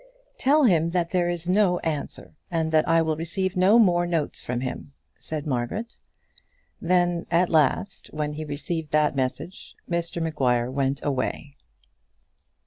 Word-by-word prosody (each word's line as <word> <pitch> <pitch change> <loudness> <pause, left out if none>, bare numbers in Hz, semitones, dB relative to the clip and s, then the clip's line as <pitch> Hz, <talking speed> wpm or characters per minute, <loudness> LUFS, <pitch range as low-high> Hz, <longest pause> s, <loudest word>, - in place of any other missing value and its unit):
"Tell 290 +3 +4
him 170 - +3
that 170 -1 -1
there 175 -2 +1
is 175 -1 -4
no 185 -1 +3
answer, 155 -3 -4 0.2
and 160 -2 -1
that 155 -1 +3
I 165 0 +4
will 160 -1 0
receive 175 +4 -2
no 190 +5 +5
more 175 -6 +4
notes 165 -4 -2
from 125 0 -3
him," 130 +2 -6 0.3
said 155 -2 -5
Margaret. 145 - -3 0.9
Then, 175 -1 +1
at 170 +1 +2
last, 160 +5 +1
when 150 -1 -3
he 155 +1 -5
received 155 +2 -4
that 150 -1 +3
message, 130 +7 -4
Mr 170 0 -2
Maguire 130 -7 0
went 135 +1 -1
away. 140 +1 -2
165 Hz, 145 wpm, -25 LUFS, 150-175 Hz, 0.9 s, no